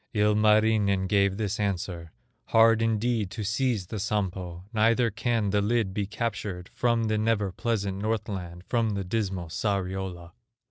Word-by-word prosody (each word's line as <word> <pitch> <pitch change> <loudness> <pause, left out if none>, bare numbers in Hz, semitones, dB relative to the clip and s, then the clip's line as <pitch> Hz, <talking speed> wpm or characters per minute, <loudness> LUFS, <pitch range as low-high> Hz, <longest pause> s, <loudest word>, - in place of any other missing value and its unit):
Ilmarinen 105 -1 +3
gave 100 0 +2
this 105 0 -2
answer: 90 -4 -3 0.3
"Hard 115 0 +5
indeed 115 -2 0
to 110 +2 -5
seize 110 -1 0
the 105 +4 -5
Sampo, 95 -4 -2
Neither 115 +2 +3
can 110 -1 0
the 105 0 +2
lid 105 -2 +1
be 100 -1 -2
captured 105 -4 -4
From 115 -1 +1
the 110 -1 0
never 105 -3 +1
pleasant 100 -1 -2
Northland, 100 -5 -3
From 115 -4 0
the 100 - -2
dismal 95 -3 -2
Sariola. 95 -2 -3
105 Hz, 140 wpm, -27 LUFS, 95-110 Hz, 0.3 s, Hard